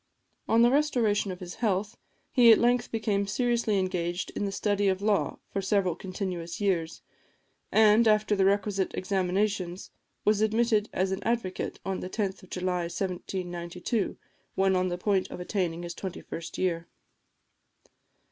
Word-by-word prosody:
On 230 Hz, +1 st, +5 dB
the 240 Hz, -, +5 dB
restoration 240 Hz, -9 st, +2 dB
of 180 Hz, -, -8 dB
his 175 Hz, -1 st, -6 dB
health, 210 Hz, 0 st, 0 dB, 0.4 s
he 240 Hz, -3 st, +7 dB
at 220 Hz, -, +8 dB
length 240 Hz, 0 st, +2 dB
became 210 Hz, -3 st, 0 dB
seriously 235 Hz, -2 st, +1 dB
engaged 180 Hz, -1 st, -2 dB
in -, -, -3 dB
the 200 Hz, -, -2 dB
study 205 Hz, 0 st, 0 dB
of 190 Hz, -1 st, +1 dB
law 210 Hz, -2 st, +1 dB, 0.2 s
for 195 Hz, -, 0 dB
several 195 Hz, -3 st, +1 dB
continuous 180 Hz, -3 st, -5 dB
years, 175 Hz, -5 st, -1 dB, 0.7 s
and, 220 Hz, +1 st, +5 dB
after 215 Hz, -1 st, +3 dB
the 195 Hz, -, +2 dB
requisite 195 Hz, 0 st, +1 dB
examinations, 190 Hz, -1 st, -1 dB, 0.3 s
was 210 Hz, 0 st, +3 dB
admitted 220 Hz, 0 st, +2 dB
as 190 Hz, +1 st, 0 dB
an 190 Hz, -, -2 dB
advocate, 230 Hz, -6 st, -2 dB
on 190 Hz, -1 st, -2 dB
the 185 Hz, -, -5 dB
10th 200 Hz, -1 st, -2 dB
of 185 Hz, -, -16 dB
July 180 Hz, -1 st, -1 dB
1792, 180 Hz, +2 st, -3 dB, 0.4 s
when 190 Hz, 0 st, +3 dB
on 185 Hz, 0 st, +2 dB
the 175 Hz, -1 st, -2 dB
point 190 Hz, 0 st, 0 dB
of -, -, -7 dB
attaining 180 Hz, -2 st, -2 dB
his 170 Hz, 0 st, -5 dB
twenty 190 Hz, 0 st, -6 dB
first 165 Hz, 0 st, -7 dB
year. 170 Hz, -2 st, -1 dB
195 Hz, 155 wpm, -28 LUFS, 180-215 Hz, 0.7 s, at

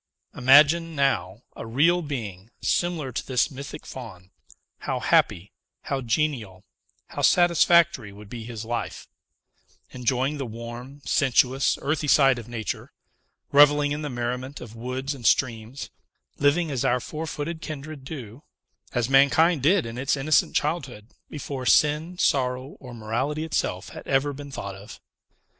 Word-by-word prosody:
"Imagine, 150 Hz, +6 st, +5 dB
now, 115 Hz, -7 st, 0 dB
a -, -, -7 dB
real 165 Hz, +10 st, +3 dB
being, 110 Hz, -, -6 dB
similar 170 Hz, -6 st, -1 dB
to 120 Hz, -, -3 dB
this 130 Hz, +3 st, +1 dB
mythic 140 Hz, +2 st, -8 dB
Faun; 95 Hz, -8 st, -10 dB, 0.5 s
how -, -, -3 dB
happy, 90 Hz, +4 st, +2 dB, 0.3 s
how 140 Hz, -1 st, -2 dB
genial, 115 Hz, -7 st, -2 dB, 0.5 s
how -, -, -5 dB
satisfactory 170 Hz, -, +4 dB
would 105 Hz, +1 st, -13 dB
be 115 Hz, +2 st, -7 dB
his 115 Hz, -1 st, -7 dB
life, 120 Hz, +1 st, -4 dB, 0.8 s
enjoying 130 Hz, +3 st, -1 dB
the 135 Hz, -, -2 dB
warm, 120 Hz, +5 st, -9 dB
sensuous, 130 Hz, +1 st, +2 dB
earthy 150 Hz, +1 st, -1 dB
side 135 Hz, -3 st, +5 dB
of 115 Hz, -, -10 dB
nature; 115 Hz, -5 st, -5 dB, 0.6 s
revelling 145 Hz, 0 st, +5 dB
in 150 Hz, +1 st, -2 dB
the 150 Hz, -, -4 dB
merriment 125 Hz, +2 st, -4 dB
of 115 Hz, -2 st, -10 dB
woods 130 Hz, +4 st, -4 dB
and 125 Hz, -5 st, -3 dB
streams; 115 Hz, +1 st, 0 dB, 0.5 s
living 150 Hz, +3 st, +2 dB
as 130 Hz, -3 st, -1 dB
our 125 Hz, -, +2 dB
four 155 Hz, +6 st, -6 dB
footed 160 Hz, +2 st, -5 dB
kindred 155 Hz, -2 st, -7 dB
do, 130 Hz, -4 st, -8 dB, 0.5 s
as 120 Hz, -1 st, 0 dB
mankind 140 Hz, +4 st, +4 dB
did 170 Hz, +4 st, +3 dB
in 115 Hz, +2 st, -6 dB
its 135 Hz, +2 st, 0 dB
innocent 145 Hz, +2 st, +2 dB
childhood; 130 Hz, -8 st, -2 dB, 0.2 s
before 140 Hz, -3 st, -6 dB
sin, 155 Hz, +4 st, +3 dB
sorrow 130 Hz, -2 st, 0 dB
or 125 Hz, -3 st, -10 dB
morality 125 Hz, +8 st, -2 dB
itself 95 Hz, -, -2 dB
had -, -, -11 dB
ever 140 Hz, +1 st, +1 dB
been 140 Hz, +1 st, -9 dB
thought 100 Hz, -7 st, -6 dB
of! 100 Hz, +3 st, -12 dB
135 Hz, 145 wpm, -25 LUFS, 120-150 Hz, 0.8 s, Imagine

